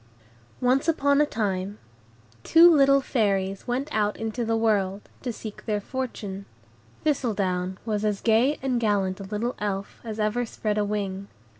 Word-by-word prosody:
Once 255 +5 +2
upon 285 -3 +3
a 300 - +3
time, 200 -4 -2 0.7
two 335 0 +7
little 275 -1 +5
Fairies 195 -6 0
went 255 +4 -1
out 210 -1 +1
into 225 +2 -3
the 225 0 0
world, 205 -3 +1 0.2
to 250 - -3
seek 215 -2 -8
their 210 -1 +1
fortune. 205 -5 -5 0.6
Thistledown 195 -10 0
was 210 -2 -1
as 210 -2 0
gay 240 +6 +3
and 255 -3 +1
gallant 200 -4 0
a - - -6
little 215 +5 -2
Elf 200 -1 -3
as 220 -2 -6
ever 215 +3 +1
spread 215 -2 -2
a - - +2
wing. 200 -1 -3
215 Hz, 155 wpm, -25 LUFS, 200-245 Hz, 0.7 s, two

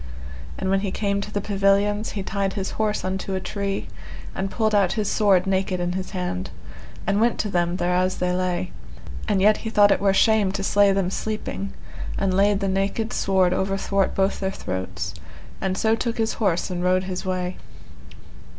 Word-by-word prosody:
And 190 - -1
when 195 - +3
he 200 0 -2
came 200 0 -1
to 210 - -6
the 205 - -1
pavilions, 200 +1 +1
he 200 - -3
tied 195 0 -1
his 195 -2 -3
horse 215 -1 -1
unto 190 +1 -2
a - - 0
tree, 200 +1 -3 0.5
and 190 0 -2
pulled 220 +1 0
out 195 -3 +3
his 215 -3 -1
sword 195 -4 +4
naked 190 -1 0
in 175 0 -1
his 185 +1 -4
hand, 180 - -3 0.6
and 200 +3 +1
went 235 +1 +3
to 210 - -3
them 175 -1 +1
thereas 180 +1 +1
they 180 0 0
lay, 180 - -1 0.6
and 190 - +2
yet 210 +1 +5
he 225 - -5
thought 205 -2 +5
it - - +2
were 200 -1 +4
shame 210 0 +4
to 195 -1 -2
slay 200 0 +4
them 195 -2 0
sleeping, 210 -2 -3 0.5
and 195 -1 +1
laid 200 +1 +3
the 195 - 0
naked 195 +4 -1
sword 190 -2 +2
overthwart 195 0 0
both 195 0 +1
their 190 - -1
throats, 95 - -4 0.5
and 190 -1 -1
so 220 +1 +3
took 230 0 -2
his 225 -1 0
horse 185 -4 +1
and 175 -1 -2
rode 185 +1 +3
his 185 -1 -4
way. 185 -1 -2
195 Hz, 190 wpm, -24 LUFS, 185-205 Hz, 0.6 s, yet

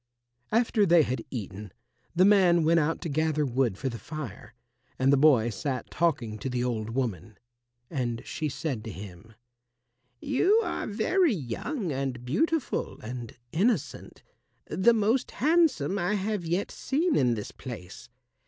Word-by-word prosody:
After 225 -1 +3
they 170 -4 +6
had 125 -3 -3
eaten, 105 -4 -6 0.4
the 185 +2 +5
man 185 -5 +5
went 165 +2 +4
out 160 +1 0
to 175 - -3
gather 155 0 +1
wood 125 -6 0
for 135 - -3
the 115 -3 -4
fire, 120 - -8 0.4
and 135 +2 +3
the - - +7
boy 130 -5 +4
sat 130 +4 -4
talking 130 -10 0
to 135 - -3
the 125 -1 -1
old 115 -3 -2
woman. 110 -6 -3 0.5
And 120 -6 -3
she 155 - -3
said 135 -6 -3
to 110 - -5
him, 100 +2 -11 0.8
"You 370 +11 +3
are - - -3
very 250 - +2
young 170 - -3
and 130 -3 -3
beautiful 295 - -1
and 120 +1 -7
innocent 175 - -1 0.4
the 230 +5 +3
most 225 +4 +1
handsome 275 - +2
I 180 +4 0
have 200 -3 -2
yet 175 +4 -1
seen 315 +5 0
in 125 -3 +3
this 105 - -6
place. 115 -1 -9
145 Hz, 150 wpm, -28 LUFS, 120-200 Hz, 0.8 s, the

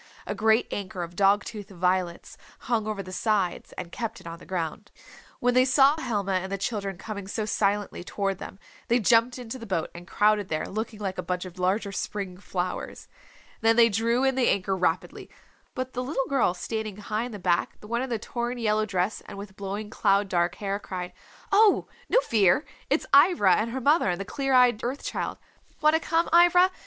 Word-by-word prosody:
A - - -3
great 220 +1 +3
anchor 185 -3 -4
of 170 +1 -8
dog 200 +2 +4
tooth 210 -3 -8
violets 180 -1 -1 0.3
hung 225 -3 -1
over 210 -2 -3
the 185 - -9
sides 195 -2 -1
and 175 -2 -7
kept 230 +1 -4
it - - -17
on 165 0 -7
the - - -15
ground. 185 +3 -4 0.5
When 245 0 +2
they 255 +1 +5
saw 270 +2 +5
Helma 205 -6 -1
and 190 0 -1
the 195 - -1
children 195 -2 -3
coming 200 0 -7
so 215 +2 -2
silently 205 -3 -1
toward 195 0 -2
them 190 - -8 0.3
they 240 +1 +3
jumped 230 +4 +3
into 250 +1 -7
the 230 - -9
boat 170 -5 -2
and 175 +1 -11
crowded 210 -1 +2
there 155 -1 -1
looking 220 +2 -4
like 190 -3 -4
a - - +1
bunch 180 +1 -3
of 185 0 -10
larger 195 +3 0
spring 195 -2 -4
flowers. 180 -2 -4 0.5
Then 225 0 +4
they 230 0 +6
drew 230 +4 +1
in 265 0 +3
the 260 -2 +2
anchor 195 0 +1
rapidly. 185 -1 -2 0.5
But 255 -1 -4
the 250 - -2
little 270 0 -1
girl 260 -10 +2
sitting 215 +1 -4
high 210 +2 -3
in 245 - -7
the 210 - -6
back, 175 -2 0
the 210 - -13
one 235 +2 -1
in 260 - -3
the 235 - 0
torn 240 +3 -4
yellow 215 -2 +1
dress 190 +1 -1
and - - -9
with 200 -1 -9
blowing 200 +2 -5
cloud 200 -2 +2
dark 175 -1 +1
hair, 200 0 -3
cried, 180 -3 -6 0.4
"Oh, 410 0 +5 0.2
no - - +5
fear, 215 - +3 0.2
it's - - +1
Ivra 280 - +6
and 220 +2 +1
her 260 +3 -3
mother 285 - +3
and 175 - -1
the 195 - -4
clear 270 +4 -2
eyed 245 -3 +4
Earth 255 +4 -3
Child. - - -3 0.4
Want 305 0 +4
to 320 - +4
come, 330 +1 +1
Ivra? 350 +2 +6
210 Hz, 210 wpm, -26 LUFS, 190-240 Hz, 0.5 s, they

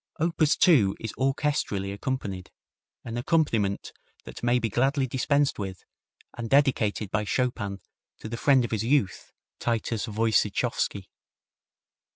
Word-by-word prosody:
Op. 165 +1 0
2 145 - +4
is 110 - -5
orchestrally 135 -8 -1
accompanied, 100 -5 -4 0.6
an 115 0 -5
accompaniment 120 -8 0 0.3
that - - -10
may 120 +1 +2
be 115 -2 0
gladly 135 +5 +1
dispensed 140 +2 +1
with, 95 -2 -6 0.5
and 120 -1 -5
dedicated 115 -8 +2
by 110 0 0
Chopin 105 -3 -1 0.4
to - - -8
the 115 - -4
friend 130 0 +3
of - - -7
his 110 -2 -1
youth, 125 -5 0 0.3
Titus 115 -1 -1
Woyciechowski. 110 -1 0
120 Hz, 125 wpm, -26 LUFS, 105-135 Hz, 0.6 s, 2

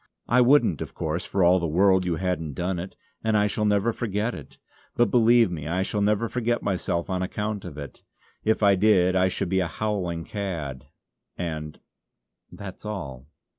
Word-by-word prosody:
I 125 +2 +4
wouldn't, 120 - +4
of - - -6
course, 80 +3 -2
for 95 - 0
all 90 +2 +5
the 85 - -1
world 95 +3 +3
you 85 -2 0
hadn't 80 -4 -2
done 90 0 -2
it; 90 +2 -7 0.3
and 110 -1 +2
I 105 - +3
shall 105 +1 -1
never 105 +2 +2
forget 110 +1 -2
it. - - -11 0.4
But 120 - +2
believe 120 -3 +5
me 75 -4 -5
I 90 +4 0
shall 105 +1 -2
never 105 +2 +2
forget 120 0 -1
myself 85 -3 -1
on 95 -1 -2
account 105 +2 -3
of 80 -5 -8
it. 70 -3 -9 0.4
If 110 0 +1
I 100 -1 +6
did 95 -2 +3
I 95 0 +4
should 95 -1 -2
be 95 +1 +2
a 90 - 0
howling 90 -4 -2
cad; 80 - -5 0.5
and 80 -3 -5 0.7
that's 95 -2 -10
all." 75 - -6
95 Hz, 185 wpm, -25 LUFS, 85-105 Hz, 0.7 s, I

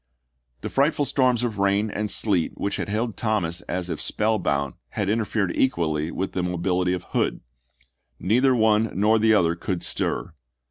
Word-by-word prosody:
The - - -4
frightful 145 +1 +2
storms 125 -3 +2
of 110 -4 -2
rain 100 +2 +1
and 105 +1 -2
sleet 95 -7 +1
which 100 - -2
had - - -4
held 110 +1 -1
Thomas 100 -7 -1
as 90 0 -2
if 80 -4 -4
spell 110 0 0
bound 70 -6 -1 0.2
had 100 -1 -2
interfered 105 -4 -1
equally 80 - 0
with 95 +2 -3
the 90 - -2
mobility 90 +1 0
of 90 - -3
Hood. - - 0 0.8
Neither 125 +6 +3
one 110 -1 +3
nor 110 +2 +4
the 110 0 +4
other 85 -4 +3
could 90 +1 -4
stir. 90 - -2
100 Hz, 170 wpm, -24 LUFS, 90-110 Hz, 0.8 s, nor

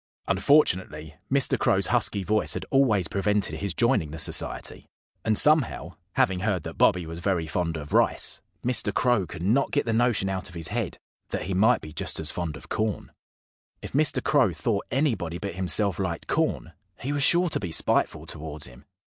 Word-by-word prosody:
Unfortunately, 95 - +1 0.2
Mr. 140 -1 +2
Crow's - - +2
husky 100 - +1
voice 105 +3 0
had - - -4
always 110 - +3
prevented 100 +2 -1
his 100 -3 -3
joining 115 - +2
the 80 - -7
Society. 80 - 0 0.4
And 110 -1 +2
somehow 150 - +3 0.2
having 95 -1 +1
heard 95 -4 -1
that - - -8
Bobby 90 -2 +3
was 80 +1 -6
very 90 -2 -1
fond 85 0 -2
of 75 -1 -8
rice - - +2 0.2
Mr. 125 -4 +1
Crow 120 -5 +1
could 85 +1 -8
not 120 +9 +2
get 145 - 0
the 115 - -1
notion 115 -4 +1
out 95 0 -3
of 90 - -14
his 80 -2 -4
head - - -3 0.3
that - - -3
he 95 - -3
might 110 +7 +3
be 75 - -10
just - - -3
as 80 -1 0
fond 80 -4 -4
of 65 - -15
corn. 110 -3 -3 0.7
If - - -7
Mr. 150 +2 +1
Crow 140 -2 +3
thought 105 -5 -2
anybody 110 - -1
but 100 0 -5
himself 95 +1 +1
liked 90 -3 -3
corn 80 - -1 0.3
he 140 +3 -3
was 145 - -1
sure 175 +4 +5
to - - -2
be 90 -5 -5
spiteful - - 0
towards 75 -1 -4
him. 60 0 -13
95 Hz, 190 wpm, -25 LUFS, 85-120 Hz, 0.7 s, sure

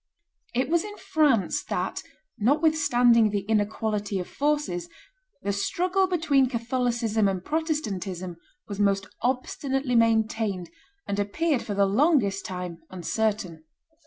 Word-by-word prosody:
It 255 +1 +1
was 335 +2 +2
in 415 0 -8
France 305 - +2
that, - - -2 0.4
notwithstanding 245 -4 +4
the 205 -1 -1
inequality 210 0 -1
of 180 - -4
forces, 285 - -1 0.5
the 200 - 0
struggle 365 - +1
between 300 -7 +2
Catholicism 235 -3 0
and 185 -2 -2
Protestantism 200 - -2 0.3
was 200 -2 -6
most 195 -1 +2 0.2
obstinately 265 +1 -1
maintained, 220 -5 +1 0.3
and 200 - -2
appeared 270 +8 0
for 205 - -4
the 200 0 +4
longest 205 - +2
time 180 -2 -5
uncertain. 185 -2 -2
225 Hz, 115 wpm, -26 LUFS, 200-285 Hz, 0.5 s, notwithstanding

